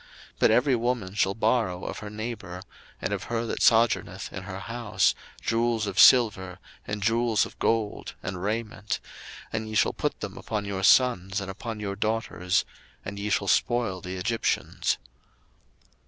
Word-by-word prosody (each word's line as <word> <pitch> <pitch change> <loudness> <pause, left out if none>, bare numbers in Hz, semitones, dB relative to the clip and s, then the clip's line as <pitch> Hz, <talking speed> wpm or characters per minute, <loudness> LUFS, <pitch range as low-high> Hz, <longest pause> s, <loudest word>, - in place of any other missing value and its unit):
02:003:022 - - -38
But - - +5
every 130 +1 +4
woman 120 -5 -1
shall 95 -1 +1
borrow 110 -6 +1
of - - -5
her 105 - -7
neighbour, 105 -4 -6 0.4
and - - -1
of - - -3
her 115 0 -2
that - - -3
sojourneth 110 -5 +2
in 95 -1 -6
her 95 -1 -6
house, 115 -2 +1 0.3
jewels 115 -1 +1
of 100 -2 -3
silver, 100 -7 +6 0.3
and 105 -1 -3
jewels 115 0 +2
of - - -13
gold, 110 -2 -1
and 95 -1 -4
raiment: 105 0 -2 0.5
and 110 0 -3
ye 110 - -5
shall - - +3
put - - -2
them - - -6
upon 105 -2 -3
your 100 -1 -3
sons, 95 -2 +4
and 95 -1 -5
upon 110 +2 -6
your 100 -2 -3
daughters; 105 -3 0 0.4
and 100 0 -5
ye 105 +1 -2
shall 100 -1 +1
spoil 105 -3 +1
the 90 +1 -6
Egyptians. 105 +5 0
105 Hz, 165 wpm, -27 LUFS, 95-115 Hz, 0.5 s, silver